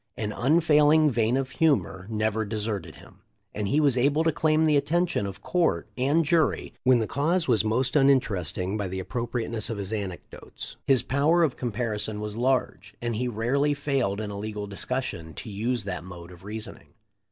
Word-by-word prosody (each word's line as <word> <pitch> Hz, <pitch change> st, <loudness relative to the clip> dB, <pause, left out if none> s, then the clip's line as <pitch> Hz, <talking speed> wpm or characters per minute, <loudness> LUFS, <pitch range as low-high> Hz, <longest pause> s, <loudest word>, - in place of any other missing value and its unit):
An 105 Hz, -1 st, -2 dB
unfailing 150 Hz, +2 st, +4 dB
vein 115 Hz, +1 st, +1 dB
of 135 Hz, 0 st, -2 dB
humor 135 Hz, -, +1 dB
never 110 Hz, 0 st, 0 dB
deserted 105 Hz, -1 st, -4 dB
him, -, -, -17 dB, 0.3 s
and 105 Hz, -1 st, -2 dB
he 145 Hz, +10 st, +2 dB
was 140 Hz, -5 st, +3 dB
able 145 Hz, +5 st, +3 dB
to 165 Hz, -, +3 dB
claim 155 Hz, +1 st, +2 dB
the 155 Hz, -1 st, +3 dB
attention 165 Hz, -, +1 dB
of 95 Hz, -, -9 dB
court 175 Hz, -2 st, 0 dB
and 145 Hz, +6 st, +2 dB
jury 160 Hz, 0 st, +1 dB
when 130 Hz, -1 st, +5 dB
the 115 Hz, -, 0 dB
cause 160 Hz, +8 st, 0 dB
was 115 Hz, -6 st, +3 dB
most 125 Hz, +5 st, 0 dB
uninteresting 105 Hz, -, +2 dB
by 100 Hz, -2 st, -2 dB
the 95 Hz, +1 st, -4 dB
appropriateness 115 Hz, +1 st, -3 dB
of 115 Hz, -, -3 dB
his 100 Hz, +1 st, -3 dB
anecdotes. 100 Hz, -5 st, -7 dB
His 135 Hz, -3 st, +4 dB
power 155 Hz, +5 st, +3 dB
of 145 Hz, -6 st, +1 dB
comparison 110 Hz, -3 st, -2 dB
was 105 Hz, 0 st, -5 dB
large, 130 Hz, +2 st, -1 dB
and 120 Hz, -1 st, -2 dB
he 125 Hz, +3 st, -1 dB
rarely 130 Hz, +6 st, +1 dB
failed 135 Hz, -8 st, -1 dB
in 105 Hz, -1 st, -4 dB
a 100 Hz, -, -6 dB
legal 105 Hz, 0 st, -4 dB
discussion 100 Hz, -, -4 dB
to 110 Hz, -, -8 dB
use 115 Hz, +3 st, -1 dB
that 95 Hz, -4 st, -5 dB
mode 90 Hz, -1 st, -10 dB
of 90 Hz, 0 st, -14 dB
reasoning. 110 Hz, +2 st, -8 dB
120 Hz, 180 wpm, -26 LUFS, 105-140 Hz, 0.3 s, when